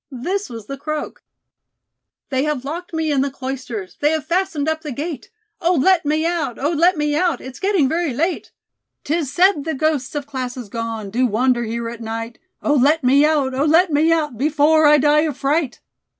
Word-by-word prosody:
This 360 Hz, +11 st, -3 dB
was 225 Hz, -3 st, -8 dB
the 275 Hz, +4 st, -7 dB
croak: 305 Hz, +1 st, -5 dB, 1.1 s
"They 260 Hz, 0 st, +1 dB
have 295 Hz, -4 st, -2 dB
locked 340 Hz, +5 st, -6 dB
me 320 Hz, -2 st, -1 dB
in 275 Hz, -2 st, +2 dB
the 280 Hz, -, 0 dB
Cloisters, 255 Hz, -8 st, -6 dB
They 295 Hz, -, +3 dB
have 310 Hz, -1 st, -1 dB
fastened 335 Hz, -3 st, -1 dB
up 315 Hz, 0 st, -1 dB
the 300 Hz, -3 st, -6 dB
gate! 290 Hz, +1 st, -5 dB, 0.3 s
Oh, 345 Hz, +2 st, +2 dB
let 330 Hz, +3 st, +3 dB
me 310 Hz, +2 st, +1 dB
out; 320 Hz, -8 st, -1 dB
Oh, 290 Hz, +4 st, 0 dB
let 340 Hz, +2 st, +3 dB
me 295 Hz, 0 st, 0 dB
out. 340 Hz, -4 st, +1 dB
It's 260 Hz, 0 st, -10 dB
getting 385 Hz, -8 st, +2 dB
very 325 Hz, +1 st, -1 dB
late. 325 Hz, +9 st, -2 dB, 0.5 s
'Tis 305 Hz, -3 st, -1 dB
said 355 Hz, 0 st, +3 dB
the 320 Hz, 0 st, -3 dB
ghosts 300 Hz, -2 st, -1 dB
of 290 Hz, -1 st, -3 dB
classes 255 Hz, -4 st, -5 dB
gone 225 Hz, -2 st, -5 dB
Do 250 Hz, +4 st, +2 dB
wander 240 Hz, +2 st, +1 dB
here 230 Hz, +1 st, -3 dB
at 235 Hz, 0 st, -7 dB
night. 230 Hz, +1 st, -5 dB, 0.2 s
Oh, 295 Hz, -, +2 dB
let 295 Hz, +3 st, +3 dB
me 270 Hz, +3 st, +5 dB
out; 290 Hz, -4 st, +1 dB
Oh, 270 Hz, +3 st, 0 dB
let 325 Hz, +2 st, +4 dB
me 310 Hz, +3 st, +3 dB
out, 300 Hz, -8 st, 0 dB
Before 305 Hz, +2 st, +4 dB
I 300 Hz, 0 st, +7 dB
die 295 Hz, +1 st, +4 dB
of 300 Hz, -3 st, -1 dB
fright! 285 Hz, -2 st, -1 dB
290 Hz, 200 wpm, -20 LUFS, 255-320 Hz, 1.1 s, I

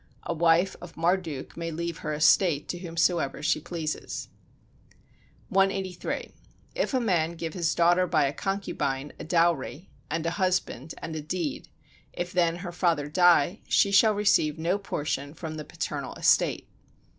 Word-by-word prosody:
A -, -, -2 dB
wife 170 Hz, +3 st, +3 dB
of 175 Hz, -1 st, -11 dB
Marduk 165 Hz, -4 st, -1 dB
may 165 Hz, 0 st, -4 dB
leave 170 Hz, +1 st, -4 dB
her 155 Hz, -, -4 dB
estate 150 Hz, 0 st, +3 dB
to 175 Hz, -, -3 dB
whomsoever 170 Hz, -4 st, 0 dB
she 155 Hz, 0 st, +1 dB
wishes. 160 Hz, -3 st, -4 dB, 1.2 s
183. 195 Hz, -3 st, 0 dB, 0.4 s
If -, -, -1 dB
a -, -, +3 dB
man 170 Hz, -8 st, +1 dB
give 165 Hz, -1 st, -5 dB
his 170 Hz, -3 st, 0 dB
daughter 175 Hz, +2 st, +4 dB
by 160 Hz, -4 st, +3 dB
a 135 Hz, -, -1 dB
concubine 145 Hz, -8 st, -3 dB
a -, -, -6 dB
dowry, 165 Hz, -2 st, 0 dB, 0.2 s
and 165 Hz, 0 st, -2 dB
a 170 Hz, -, +1 dB
husband, 180 Hz, -6 st, -1 dB
and 160 Hz, -, -5 dB
a 155 Hz, -, -3 dB
deed; 155 Hz, -2 st, -4 dB, 0.4 s
if 175 Hz, 0 st, -4 dB
then 170 Hz, -2 st, +2 dB
her 175 Hz, -, -4 dB
father 170 Hz, -5 st, 0 dB
die, 175 Hz, +2 st, +4 dB
she 200 Hz, -, +4 dB
shall 215 Hz, +2 st, +5 dB
receive 180 Hz, -7 st, +2 dB
no 170 Hz, +5 st, 0 dB
portion 145 Hz, -5 st, -3 dB
from 155 Hz, -2 st, -6 dB
the 155 Hz, -, -5 dB
paternal -, -, -5 dB
estate. -, -, +2 dB
170 Hz, 155 wpm, -27 LUFS, 155-180 Hz, 1.2 s, shall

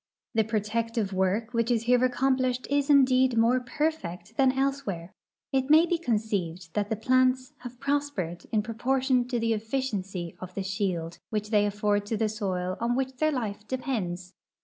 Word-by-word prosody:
The 225 Hz, -1 st, +3 dB
pro 215 Hz, 0 st, 0 dB
tective 225 Hz, 0 st, -1 dB
w'ork 195 Hz, +5 st, 0 dB
which 230 Hz, 0 st, +1 dB
is 235 Hz, -2 st, +2 dB
here 250 Hz, +1 st, +3 dB
accomplished 255 Hz, 0 st, +1 dB
is 285 Hz, 0 st, +1 dB
indeed 260 Hz, -3 st, +5 dB
more 235 Hz, +3 st, +4 dB
perfect 240 Hz, -, -3 dB
than 265 Hz, 0 st, +4 dB
elsewhere. 265 Hz, -11 st, -2 dB, 0.4 s
It 265 Hz, 0 st, +1 dB
may 315 Hz, +3 st, +7 dB
be 345 Hz, 0 st, 0 dB
conceived 200 Hz, -, -2 dB
that 205 Hz, 0 st, -1 dB
the 220 Hz, -, 0 dB
plants 255 Hz, +4 st, +2 dB
have 245 Hz, -1 st, -9 dB
pros 285 Hz, +1 st, 0 dB
pered 175 Hz, -9 st, -5 dB
in 215 Hz, -2 st, +2 dB
proportion 250 Hz, +2 st, +1 dB
to 245 Hz, -2 st, -1 dB
the 230 Hz, 0 st, +1 dB
efficiency 210 Hz, -6 st, -3 dB
of 185 Hz, 0 st, -9 dB
the 195 Hz, -, -2 dB
shield 185 Hz, -4 st, -2 dB
which 210 Hz, 0 st, -3 dB
they 205 Hz, -1 st, +4 dB
afford 205 Hz, 0 st, 0 dB
to 220 Hz, -, -1 dB
the 220 Hz, 0 st, +1 dB
soil 185 Hz, -4 st, -2 dB
on 235 Hz, +1 st, 0 dB
which 260 Hz, 0 st, -2 dB
their 310 Hz, +3 st, +2 dB
life 215 Hz, -6 st, -4 dB
depends. 195 Hz, -9 st, -3 dB
230 Hz, 175 wpm, -27 LUFS, 200-260 Hz, 0.4 s, may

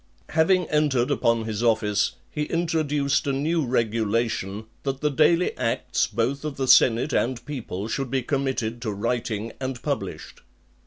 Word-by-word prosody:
XX. -, -, -11 dB
Having 175 Hz, +2 st, +3 dB
entered 145 Hz, -5 st, +2 dB
upon 115 Hz, -1 st, +2 dB
his 110 Hz, -1 st, -3 dB
office, 105 Hz, -3 st, +2 dB, 0.2 s
he 150 Hz, 0 st, -2 dB
introduced 150 Hz, -4 st, 0 dB
a -, -, +2 dB
new 155 Hz, +4 st, 0 dB
regulation, 110 Hz, -3 st, -1 dB, 0.2 s
that 135 Hz, -1 st, -3 dB
the 150 Hz, 0 st, +1 dB
daily 165 Hz, +5 st, +3 dB
acts 125 Hz, +1 st, 0 dB
both 120 Hz, +5 st, -1 dB
of 150 Hz, -3 st, -4 dB
the 135 Hz, -1 st, -1 dB
senate 125 Hz, +3 st, +5 dB
and 125 Hz, 0 st, 0 dB
people 110 Hz, -8 st, -5 dB
should 135 Hz, +3 st, -2 dB
be 130 Hz, 0 st, 0 dB
committed 130 Hz, -4 st, -2 dB
to 110 Hz, -3 st, -2 dB
writing, 115 Hz, +1 st, -2 dB
and 130 Hz, -2 st, -4 dB
published. -, -, -4 dB
130 Hz, 155 wpm, -25 LUFS, 115-145 Hz, 0.2 s, senate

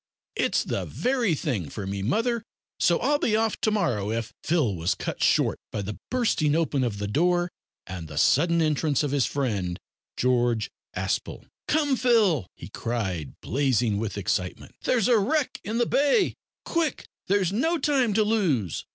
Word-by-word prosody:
It's -, -, +1 dB
the -, -, -2 dB
very 245 Hz, -9 st, 0 dB
thing 110 Hz, -, -2 dB
for 100 Hz, +7 st, -6 dB
me, 100 Hz, 0 st, -3 dB
mother, 230 Hz, -, 0 dB, 0.4 s
so 170 Hz, -, +4 dB
I'll 290 Hz, +4 st, +2 dB
be 215 Hz, -, +1 dB
off 220 Hz, 0 st, 0 dB
to -, -, +3 dB
morrow 120 Hz, -, 0 dB
if 115 Hz, 0 st, -3 dB
" -, -, -66 dB
Phil 150 Hz, -, +1 dB
was 85 Hz, +2 st, 0 dB
cut -, -, -5 dB
short -, -, +3 dB
by 105 Hz, -, -3 dB
the 105 Hz, +2 st, -6 dB
bursting 210 Hz, -12 st, +1 dB
open 150 Hz, -5 st, +1 dB
of 115 Hz, -5 st, -2 dB
the 100 Hz, 0 st, -3 dB
door 175 Hz, +8 st, +1 dB, 0.3 s
and 90 Hz, -3 st, -7 dB
the 75 Hz, -1 st, -9 dB
sudden 170 Hz, -, +3 dB
entrance 150 Hz, -1 st, +1 dB
of 145 Hz, -, -1 dB
his 140 Hz, -3 st, +2 dB
friend 100 Hz, -11 st, -2 dB, 0.4 s
George 120 Hz, -3 st, +1 dB, 0.2 s
Aspel. -, -, -3 dB, 0.2 s
"Come, 295 Hz, -3 st, +2 dB
Phil," 215 Hz, -, +3 dB
he -, -, -10 dB
cried, 95 Hz, -, -3 dB
blazing 120 Hz, -5 st, +1 dB
with 110 Hz, -2 st, -3 dB
excitement, 90 Hz, -2 st, -2 dB
"there's 235 Hz, -6 st, +2 dB
a 240 Hz, -3 st, +5 dB
wreck 290 Hz, +7 st, 0 dB
in 220 Hz, +2 st, -3 dB
the 240 Hz, -, +3 dB
bay. 290 Hz, -, +2 dB, 0.3 s
Quick! 330 Hz, -5 st, -1 dB, 0.2 s
there's 195 Hz, -2 st, +2 dB
no 325 Hz, +10 st, +1 dB
time 265 Hz, -7 st, +1 dB
to 215 Hz, -, +4 dB
lose." 170 Hz, -, 0 dB
155 Hz, 170 wpm, -26 LUFS, -, 0.4 s, a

